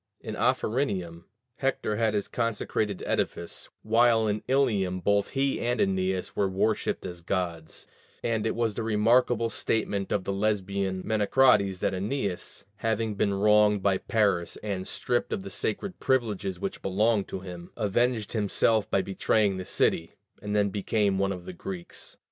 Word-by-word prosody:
In -, -, -6 dB
Ophrynium, 95 Hz, -9 st, 0 dB, 0.3 s
Hector 135 Hz, -6 st, -1 dB
had 110 Hz, -1 st, +1 dB
his 100 Hz, -, -1 dB
consecrated 110 Hz, -3 st, -2 dB
edifice, 85 Hz, -, -2 dB
while 115 Hz, 0 st, +4 dB
in 105 Hz, 0 st, -1 dB
Ilium 105 Hz, -9 st, +1 dB
both 100 Hz, +2 st, +1 dB
he 135 Hz, 0 st, +1 dB
and 120 Hz, +1 st, 0 dB
Æneas 95 Hz, -1 st, 0 dB
were 100 Hz, -1 st, +1 dB
worshipped 100 Hz, +3 st, 0 dB
as 90 Hz, -2 st, -7 dB
gods: 85 Hz, -3 st, -3 dB, 0.4 s
and 110 Hz, -1 st, 0 dB
it -, -, -1 dB
was 115 Hz, -2 st, 0 dB
the 115 Hz, -, -4 dB
remarkable 115 Hz, +1 st, +2 dB
statement 100 Hz, -4 st, -1 dB
of 100 Hz, -, 0 dB
the 100 Hz, -, -2 dB
Lesbian 100 Hz, -2 st, -1 dB
Menecrates 105 Hz, -2 st, +3 dB
that 100 Hz, -, +1 dB
Æneas, 100 Hz, 0 st, -3 dB
"having 110 Hz, 0 st, -1 dB
been 100 Hz, 0 st, 0 dB
wronged 105 Hz, 0 st, +4 dB
by 95 Hz, -2 st, +2 dB
Paris 100 Hz, -6 st, +1 dB
and 100 Hz, -3 st, -3 dB
stripped 120 Hz, -1 st, -1 dB
of 95 Hz, -, -2 dB
the 100 Hz, -, -8 dB
sacred 185 Hz, -, -3 dB
privileges 105 Hz, -8 st, 0 dB
which 100 Hz, 0 st, -4 dB
belonged 105 Hz, +2 st, +1 dB
to 95 Hz, -, -5 dB
him, 90 Hz, -2 st, -9 dB
avenged 115 Hz, +1 st, 0 dB
himself 110 Hz, 0 st, +2 dB
by 95 Hz, -, +2 dB
betraying 100 Hz, +1 st, +1 dB
the 95 Hz, -, -5 dB
city, 80 Hz, -, 0 dB, 0.3 s
and 105 Hz, 0 st, -3 dB
then 100 Hz, -1 st, +3 dB
became 100 Hz, 0 st, 0 dB
one 100 Hz, 0 st, +1 dB
of 90 Hz, -2 st, -6 dB
the 95 Hz, -, -7 dB
Greeks." 90 Hz, 0 st, -8 dB
105 Hz, 155 wpm, -27 LUFS, 95-110 Hz, 0.4 s, while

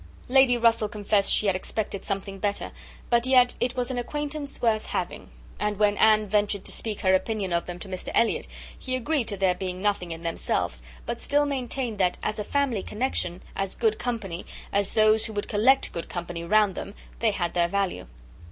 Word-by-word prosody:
Lady 260 Hz, -1 st, +5 dB
Russell 230 Hz, -2 st, +3 dB
confessed 205 Hz, -1 st, +1 dB
she -, -, +4 dB
had 195 Hz, -2 st, +3 dB
expected 200 Hz, +1 st, -3 dB
something 195 Hz, 0 st, -4 dB
better; 205 Hz, 0 st, -2 dB, 0.4 s
but 235 Hz, +1 st, +3 dB
yet 250 Hz, -1 st, +5 dB
"it 245 Hz, +1 st, 0 dB
was 250 Hz, 0 st, -1 dB
an 250 Hz, -, -2 dB
acquaintance 295 Hz, +3 st, -4 dB
worth 220 Hz, -2 st, +1 dB
having;" 180 Hz, -, -4 dB, 0.3 s
and 210 Hz, -1 st, -1 dB
when 210 Hz, 0 st, +3 dB
Anne 215 Hz, -1 st, +5 dB
ventured 205 Hz, -1 st, +1 dB
to -, -, -1 dB
speak 215 Hz, -3 st, 0 dB
her 190 Hz, -1 st, +3 dB
opinion 195 Hz, -1 st, 0 dB
of 170 Hz, -, 0 dB
them 175 Hz, 0 st, -5 dB
to 195 Hz, -, -9 dB
Mr 185 Hz, -1 st, -5 dB
Elliot, 230 Hz, -, +2 dB, 0.3 s
he 255 Hz, -1 st, -3 dB
agreed 255 Hz, 0 st, 0 dB
to 200 Hz, -, -1 dB
their 190 Hz, -1 st, +3 dB
being 185 Hz, 0 st, -5 dB
nothing 200 Hz, -3 st, 0 dB
in 165 Hz, +1 st, -7 dB
themselves, 115 Hz, -, -1 dB, 0.2 s
but -, -, -4 dB
still 290 Hz, +1 st, +2 dB
maintained 255 Hz, -5 st, -3 dB
that, 180 Hz, -2 st, +2 dB
as 215 Hz, -, -2 dB
a -, -, -1 dB
family 260 Hz, -3 st, 0 dB
connexion, 210 Hz, -7 st, -2 dB
as 195 Hz, -1 st, -2 dB
good 220 Hz, -2 st, +1 dB
company, 210 Hz, -8 st, -3 dB, 0.3 s
as 200 Hz, -1 st, +1 dB
those 215 Hz, +1 st, +4 dB
who 220 Hz, -, -8 dB
would 205 Hz, -1 st, -3 dB
collect 255 Hz, +6 st, +3 dB
good 170 Hz, -, -5 dB
company 175 Hz, -1 st, -5 dB
around 210 Hz, +2 st, +3 dB
them, 200 Hz, -, -7 dB, 0.2 s
they 230 Hz, -, +3 dB
had 175 Hz, -5 st, -2 dB
their 175 Hz, -1 st, +2 dB
value. 195 Hz, -, -2 dB
210 Hz, 200 wpm, -26 LUFS, 190-240 Hz, 0.4 s, Lady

